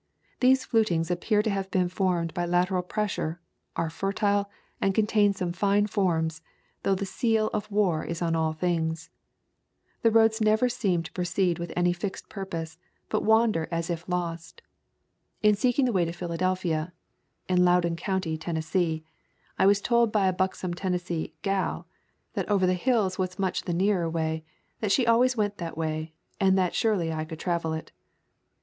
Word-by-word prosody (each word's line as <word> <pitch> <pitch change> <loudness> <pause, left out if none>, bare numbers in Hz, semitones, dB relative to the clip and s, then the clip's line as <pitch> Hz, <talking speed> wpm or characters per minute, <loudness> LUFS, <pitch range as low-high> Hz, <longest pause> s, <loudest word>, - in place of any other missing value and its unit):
These 260 +1 +4
flutings 180 -7 +1
appear 210 +4 +1
to 220 - 0
have 195 -1 -2
been 185 -2 +1
formed 175 -2 0
by 175 -1 -1
lateral 180 +1 +2
pressure, 180 -4 -2 0.4
are 165 -1 -1
fertile, 200 +2 0 0.3
and 195 -1 +1
contain 210 -1 +3
some 180 -3 -3
fine 200 +3 +2
forms, 165 -6 0 0.4
though 195 - +2
the 200 +1 -3
seal 220 +2 +1
of 210 +1 -2
war 195 -6 +1
is 170 0 -4
on 165 -1 0
all 160 -1 +1
things. 160 -1 -2 0.9
The 230 - +5
roads 225 0 +4
never 215 +3 +3
seem 195 -8 0
to 165 - -9
pro 180 - -3
ceed 180 -1 +1
with 170 -1 -5
any 175 0 +2
fixed 190 +2 -5
purpose, 165 -5 -6 0.3
but - - 0
wander 220 -7 +3
as 165 0 -2
if 170 +1 -5
lost. 175 - -4 0.8
In 210 0 +6
seeking 245 +5 +2
the 245 - 0
way 180 -3 +3
to 165 - -3
Philadelphia 175 -1 -1 0.5
[in 180 -1 +3
Loudon 175 -1 +3
County, 175 -2 -2
Tennessee], 160 0 -1 0.6
I 190 - +5
was 200 0 +4
told 235 -1 +3
by 210 -3 +2
a 185 - +2
buxom 185 -1 -1
Tennessee 175 -3 -3
"gal" 195 -1 -1 0.5
that - - -3
over 195 -3 +3
the 185 - +3
hills 195 -1 +1
was 185 -1 -2
much 190 -2 -1
the 180 - -2
nearer 180 -1 +1
way, 160 -1 -2 0.4
that 210 -3 -1
she 250 +3 +3
always 245 +2 +4
went 205 -1 -1
that 165 -2 -5
way, 155 0 -3 0.2
and 190 -1 +4
that 185 -2 +1
surely 185 -8 +1
I 155 0 -2
could 155 0 -8
travel 170 -3 -1
it. 160 - -6
185 Hz, 170 wpm, -27 LUFS, 170-205 Hz, 0.9 s, In